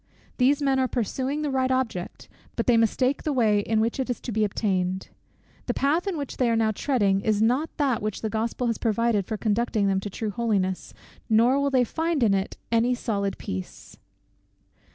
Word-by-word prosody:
These 275 +3 +3
men 270 -1 +2
are 260 - +2
pursuing 260 +5 -2
the 295 - -1
right 260 -1 +1
object, 250 -9 -2 0.3
but - - -1
they 245 - +4
mistake 255 +4 +2
the 305 - -1
way 220 -6 +3
in 215 +2 0
which 230 +4 0
it 265 - -2
is 245 - -2
to 245 - -5
be 215 0 +1
obtained. 190 -3 -1 0.6
_The - - -1
path 310 +8 +1
in 375 -4 -1
which 285 -2 -5
they 250 -2 +2
are 230 - +2
now 220 -1 +2
treading 205 -5 +1
is 215 -1 +1
not 250 +8 +2
that 270 -6 +1
which 215 -1 -3
the - - +1
Gospel 230 +3 -2
has 230 -2 -1
provided 225 -3 +1
for 220 - -3
conducting 220 0 0
them 195 -1 +2
to 205 - -5
true 210 +2 -4
holiness, 200 -5 -1 0.3
nor 235 +5 +4
will 280 0 +1
they 260 -2 +3
find 320 +3 -1
in 210 -3 +4
it 195 0 -2
any 235 +2 +3
solid 200 -5 -2
peace. 95 0 -7
230 Hz, 200 wpm, -25 LUFS, 210-260 Hz, 0.6 s, they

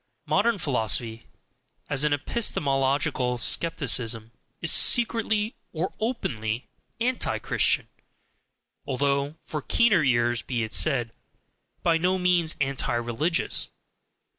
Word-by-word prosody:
Modern 235 -2 +2
philosophy, 115 - -1 0.6
as 145 -1 0
epistemological 135 - 0
skepticism, 120 -6 +1 0.3
is 170 - +2
secretly 225 -2 +3 0.2
or 170 +3 -3
openly 120 - -3 0.3
ANTI 250 +2 0
CHRISTIAN, - - +1 1.0
although 140 +2 0
(for 150 - -4
keener 205 - +3
ears, 120 -2 +1
be 120 -3 -3
it 110 - -6
said) 120 -7 +2 0.7
by 165 -1 +3
no 185 +2 +1
means 180 -3 +2
anti 135 -3 -1
religious. 120 +9 -1
140 Hz, 95 wpm, -25 LUFS, 120-180 Hz, 1.0 s, secretly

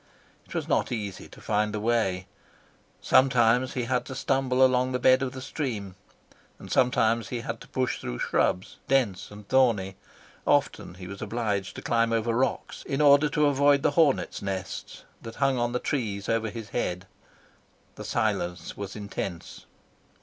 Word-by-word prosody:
It - - -10
was - - -2
not - - +1
easy 105 -5 -4
to - - -15
find 105 0 0
the - - -2
way. 105 -5 0 0.8
Sometimes 125 -1 +4
he 125 - -2
had 125 0 0
to 130 - -7
stumble 130 -1 +2
along 130 0 +2
the 125 - 0
bed 130 +1 +5
of 135 -2 -1
the 130 -1 -7
stream, 115 - -4 0.6
and - - -11
sometimes 115 -3 +2
he 120 -2 -3
had 115 -2 -5
to - - -12
push 130 -1 -1
through - - -4
shrubs, 90 +8 0
dense 125 -9 +1
and 105 -1 -12
thorny; 105 -8 +2 0.5
often - - +1
he 95 0 -10
was 100 +2 -8
obliged 105 -3 -2
to - - -8
climb 115 0 +1
over 115 0 +1
rocks 130 +3 -1
in 135 - -2
order 145 0 +6
to 150 +1 +2
avoid 140 0 +4
the - - +3
hornet 145 -2 +2
nests 95 -1 -5 0.2
that 115 0 -9
hung 135 -2 +1
on 120 0 0
the 125 - 0
trees 110 -7 -2
over 115 -1 0
his 110 -1 -8
head. 90 -5 -2 0.9
The - - -9
silence 85 -1 -2
was 100 -1 -6
intense. 100 -4 -6
115 Hz, 170 wpm, -27 LUFS, 100-130 Hz, 0.9 s, order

